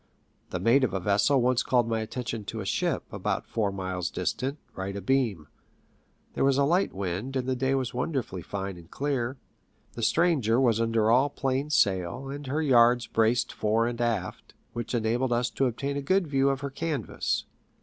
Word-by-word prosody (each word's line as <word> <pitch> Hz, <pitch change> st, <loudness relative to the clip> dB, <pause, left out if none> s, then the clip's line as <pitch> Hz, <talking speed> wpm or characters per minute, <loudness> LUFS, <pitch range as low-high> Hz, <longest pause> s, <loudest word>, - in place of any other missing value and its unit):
The -, -, -3 dB
mate 115 Hz, +8 st, +4 dB
of 105 Hz, -7 st, 0 dB
a -, -, 0 dB
vessel 100 Hz, +8 st, +3 dB
once 125 Hz, 0 st, +3 dB
called 120 Hz, -2 st, +2 dB
my 115 Hz, -1 st, 0 dB
attention 115 Hz, 0 st, -4 dB
to 110 Hz, -, -5 dB
a 100 Hz, -, -4 dB
ship, -, -, 0 dB
about -, -, -2 dB
four 105 Hz, -3 st, -1 dB
miles 95 Hz, -2 st, -3 dB
distant, 135 Hz, +3 st, -2 dB, 0.2 s
right 95 Hz, +1 st, -5 dB
abeam. 100 Hz, -, 0 dB, 0.9 s
There -, -, 0 dB
was 135 Hz, 0 st, +3 dB
a 140 Hz, -, +4 dB
light 175 Hz, +7 st, +2 dB
wind, 100 Hz, +7 st, -4 dB
and 130 Hz, -1 st, -1 dB
the 130 Hz, -, +1 dB
day 130 Hz, +1 st, +1 dB
was 130 Hz, -2 st, -2 dB
wonderfully 125 Hz, -, -2 dB
fine 95 Hz, +1 st, -5 dB
and 85 Hz, -1 st, -14 dB
clear. 135 Hz, -1 st, -2 dB, 0.6 s
The 115 Hz, -, -6 dB
stranger 130 Hz, -3 st, +3 dB
was 115 Hz, -4 st, +3 dB
under 115 Hz, -1 st, +2 dB
all 130 Hz, +4 st, +4 dB
plain 135 Hz, +1 st, -1 dB
sail, 100 Hz, -, +1 dB
and 140 Hz, 0 st, -6 dB
her 150 Hz, +4 st, 0 dB
yards 120 Hz, -3 st, +5 dB
braced 120 Hz, +2 st, +1 dB
fore 110 Hz, +2 st, +1 dB
and 120 Hz, 0 st, -3 dB
aft, 115 Hz, -6 st, -2 dB, 0.2 s
which 120 Hz, +1 st, -3 dB
enabled 120 Hz, +2 st, +1 dB
us 120 Hz, 0 st, 0 dB
to 135 Hz, -, +1 dB
obtain 140 Hz, +4 st, -3 dB
a -, -, -2 dB
good 185 Hz, +6 st, +2 dB
view 140 Hz, -2 st, +2 dB
of 135 Hz, -1 st, -1 dB
her 140 Hz, -1 st, -4 dB
canvas. 155 Hz, 0 st, -2 dB
120 Hz, 190 wpm, -27 LUFS, 110-135 Hz, 0.9 s, yards